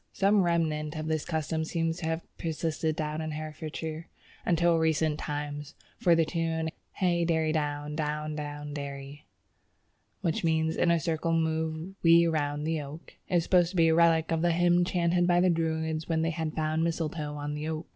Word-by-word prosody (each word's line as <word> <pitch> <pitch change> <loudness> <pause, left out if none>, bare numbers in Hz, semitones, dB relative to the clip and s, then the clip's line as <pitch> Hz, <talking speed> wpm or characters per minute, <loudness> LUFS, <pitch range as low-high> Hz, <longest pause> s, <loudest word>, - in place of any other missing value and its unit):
Some 200 +1 +3
remnant 160 -3 0
of 155 0 -4
this 160 -1 -1
custom 160 -1 -1
seems 165 0 -1
to 170 -3 -4
have 160 +1 -2 0.2
persisted 160 -1 -2
in 155 +1 -2
Herefordshire 155 +1 -5 0.4
until 170 -1 +3
recent 160 -1 +1
times, 145 0 -5 0.2
for 175 -2 +5
the 165 -1 +3
tune 165 -1 -1 0.2
"Hey 175 -3 +1
derry 160 -2 +1
down, 150 -1 -2
down 150 0 -2
down 145 -1 -5
derry" 140 0 -7 0.9
(which 165 - -1
means 160 -1 +1
in 175 - +2
a 170 0 +4
circle 165 +1 -1
move 160 +2 -1
we 170 0 +6
round 150 -2 -1
the 160 -1 0
oak) 150 +3 -10 0.2
is 175 -3 +2
supposed 175 -1 +3
to 190 - -9
be 165 -2 +5
a - - +4
relic 165 -1 +4
of 165 -1 +1
the 175 0 +3
hymn 175 +1 +4
chanted 175 -1 +1
by 175 0 +4
the 180 0 +4
Druids 160 -1 -1
when 160 -1 +1
they 165 - +1
had 160 -1 -3
found 155 0 0
mistletoe 160 -3 -2
on 145 0 -4
the 150 +1 -4
oak. 160 +1 -3
160 Hz, 180 wpm, -29 LUFS, 155-170 Hz, 0.9 s, we